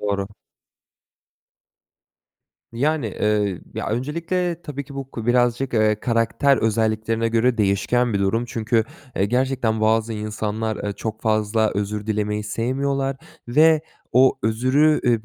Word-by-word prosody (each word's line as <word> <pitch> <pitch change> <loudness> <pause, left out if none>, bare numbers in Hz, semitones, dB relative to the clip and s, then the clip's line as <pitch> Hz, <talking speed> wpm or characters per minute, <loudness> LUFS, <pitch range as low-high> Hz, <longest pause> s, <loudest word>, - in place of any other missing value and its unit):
Doğru. 100 -1 -1 2.4
Yani, 145 +2 0
eee, 105 -2 0
ya, - - -3
öncelikle 170 +8 -2
tabii 140 -1 -6
ki 140 +1 -12
bu 135 -1 -6
ko 115 -1 -6
birazcık, 120 +1 +2
eee, 110 -1 +2
karakter 115 +3 +2
özelliklerine 110 0 0
göre 115 +1 +1
değişken 110 +4 +1
bir - - +2
durum 100 +5 +1
çünkü, 115 -1 0 0.3
eee, 95 - +2
gerçekten 125 -1 0
bazı 110 +1 +2
insanlar, 110 0 -3
eee, 105 - -1
çok 110 +1 -5
fazla 110 0 +1
özür 105 +1 -3
dilemeyi 105 -1 -1
sevmiyorlar 135 +5 -1 0.3
ve 155 +5 +5 0.3
o 130 +2 +5
özrü, 130 +8 +3
ııı, 115 -3 +2
115 Hz, 125 wpm, -22 LUFS, 110-130 Hz, 2.4 s, ve